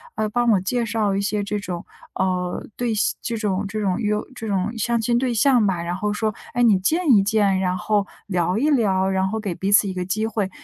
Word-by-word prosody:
呃， 215 - 0
帮 240 +2 +1
我 200 - +4
介 235 +5 -1
绍 215 -2 0
一 - - 0
些 205 0 -1
这 205 +1 -2
种， 180 -4 -6 0.3
呃， 180 -1 -1
对 240 -2 -1
象 210 -1 +1
这 230 -2 -2
种 205 -2 -1
这 215 +2 -4
种 190 -3 0
约 210 -1 0 0.2
这 225 -2 -6
种 195 0 0
相 235 +2 0
亲 235 +2 +1
对 250 0 0
象 240 0 +4
吧， 180 -3 -1
然 170 +1 -3
后 210 +3 -2
说： 215 0 -1 0.2
“哎， 245 - +2
你 220 -5 +5
见 315 - +1
一 210 -5 +7
见， 200 -2 +2
然 185 -1 0
后 205 +1 0 0.2
聊 180 -1 0
一 285 +7 +2
聊， 195 -9 +2
然 190 0 +1
后 220 +3 -2
给 205 -4 -3
彼 195 - -2
此 205 - +6
一 190 - -3
个 180 -1 -3
机 215 +4 -1
会。” 210 -3 -2
210 Hz, 260 characters per minute, -22 LUFS, 190-225 Hz, 0.3 s, 一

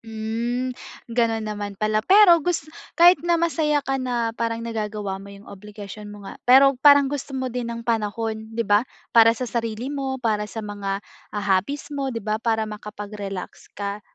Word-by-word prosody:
Hmm, 230 +3 -3 0.4
gano'n 225 -2 +1
naman 205 -1 -5
pala. 215 +1 +1
Pero 370 - +7
gus 345 -1 -1 0.3
kahit 350 +2 +7
na 345 0 +2
masaya 310 -4 +1
ka 270 0 -1
na 240 -3 -1
parang 230 0 -3
nagagawa 210 -4 -4
mo 200 - -11
'yong 200 +1 -13
obligasyon 210 +1 -10
mo 205 -1 -11
nga, - - -10
pero 270 +2 +8
parang 285 0 +7
gusto 275 0 -4
mo 260 -2 -3
din 245 -1 -3
ng 235 0 -6
panahon, 220 -1 -2
'di 230 +1 -2
ba, 205 +1 +4 0.3
para 230 0 +6
sa 255 - -3
sarili 235 +2 -3
mo, 270 -2 -2
para 215 -4 -1
sa 220 0 -6
mga, 200 -1 -4 0.3
ah, 205 - -2
hobbies 280 +10 -1
mo, 275 -2 -2
'di 230 -5 -5
ba, 215 +1 -1
para 220 -2 +1
makapag-relax 210 -2 -7
ka, 200 +1 -4
225 Hz, 180 wpm, -23 LUFS, 210-260 Hz, 0.4 s, pero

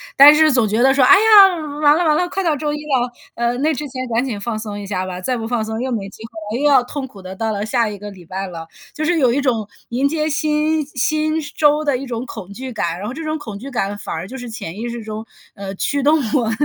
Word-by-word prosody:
但 285 +2 +10
是 310 0 +5
总 240 -5 +3
觉 220 +3 0
得 265 - +5
说， 275 - +3
哎 255 - +8
呀， 405 -4 +7 0.3
完 295 0 +6
了 350 - +1
完 305 - +4
了， 360 - +1
快 390 +1 -2
到 320 -3 +2
周 295 +1 -2
一 - - -3
了， 265 -5 -1 0.2
呃， 235 +1 0
那 305 +3 +2
之 290 +3 -5
前 255 0 -5
赶 235 +3 +1
紧 230 -6 -4
放 225 +1 -3
松 210 -1 -6
一 200 - -7
下 185 -2 -2
吧， 185 -1 -6
再 250 +6 -1
不 225 - -4
放 235 -1 -1
松 220 +1 -4
又 260 - -2
没 200 -5 -3
机 220 - -13
会 220 -1 -6
了， 270 - -3
又 295 - +5
要 265 -3 +6
痛 270 +2 -5
苦 200 -6 -14
地 185 +1 -8
到 225 +2 -2
了 205 -1 -2
下 230 0 +1
一 205 - -7
个 205 - -7
礼 185 -3 -13
拜 190 +3 -5
了。 165 -2 -8 0.3
就 310 - -2
是 345 0 +2
有 255 -4 +4
一 270 - +1
种 230 -6 0 0.2
迎 255 +4 +1
接 305 +1 -1
新 305 +1 +1
新 310 +3 0 0.2
周 300 0 +3
的 285 -3 +1
一 275 - -6
种 240 0 -4
恐 200 -6 -9
惧 260 +4 -7
感， 170 -5 -2
然 200 +3 -5
后， 245 - -4
这 325 - -6
种 310 0 -2
恐 215 -8 -8
惧 265 +5 -8
感 205 -6 -2
反 - - -5
而 160 +3 -5
就 255 - -9
是 245 -2 -7
潜 190 -5 -7
意 240 +1 -3
识 235 -1 -6
中， 215 +1 -6 0.3
嗯， 195 -1 -6
驱 285 +7 0
动 300 +3 +5 0.2
我 240 -6 +2
245 Hz, 305 characters per minute, -19 LUFS, 215-295 Hz, 0.3 s, 但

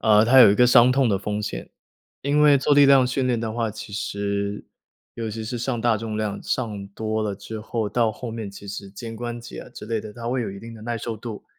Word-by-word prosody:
呃， 105 -1 +5
它 130 +3 +6
有 115 -5 +9
一 100 - +3
个 125 +3 +5
伤 125 +1 +6
痛 135 -2 +3
的 100 -3 +1
风 105 +1 -3
险。 105 - -5 0.5
因 145 +2 +2
为 145 -2 +6
做 145 +2 +2
力 145 0 +7
量 135 -2 +6
训 130 +1 -1
练 120 -3 +1
的 110 -1 -3
话， 115 -1 -1
其 110 +1 -9
实 100 0 -3 0.5
尤 115 -2 -4
其 110 +1 -5
是 120 +3 -4
上 120 0 -2
大 115 -1 +2
重 110 0 -4
量 105 -2 -3
上 105 -6 -3
多 110 +2 -3
了 105 -2 -2
之 110 +2 -8
后， 110 0 -2
到 115 -1 +1
后 120 0 -7
面 110 -3 -5
其 100 0 -11
实 100 0 -7
肩 115 +3 -8
关 120 0 -5
节 120 - -9
啊 - - -11
之 105 - -10
类 115 0 -1
的， 105 -1 -9
它 115 +1 -6
会 125 -1 0
有 - - -4
一 100 0 -9
定 115 0 -10
的 110 - -12
耐 120 0 -3
受 115 -1 -4
度。 110 -1 -8
115 Hz, 280 characters per minute, -23 LUFS, 105-120 Hz, 0.5 s, 有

